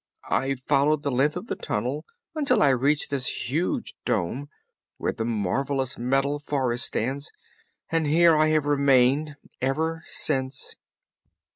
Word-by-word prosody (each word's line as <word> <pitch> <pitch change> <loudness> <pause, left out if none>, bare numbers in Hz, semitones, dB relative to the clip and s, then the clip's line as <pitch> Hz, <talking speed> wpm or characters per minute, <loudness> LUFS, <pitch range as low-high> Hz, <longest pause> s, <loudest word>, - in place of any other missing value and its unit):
I 135 +4 +1
followed 145 +3 +1
the 140 - 0
length 140 +6 +2
of 180 - -6
the - - -3
tunnel - - -3 0.3
until 300 - +2
I 145 - +5
reached 140 +4 +1
this 125 -3 -2
huge 165 +6 -1
dome, 130 +12 -1 0.5
where - - -1
the 110 - -3
marvelous 130 +5 -1
Metal 135 +4 +1
Forest 130 -4 -1
stands, 135 +5 -3 0.6
and 165 -2 +1
here 165 +2 +5
I 155 0 +4
have 155 -1 +2
remained 140 +1 +3 0.3
ever 160 +5 -1
since." 130 -2 -3
140 Hz, 135 wpm, -25 LUFS, 130-150 Hz, 0.6 s, I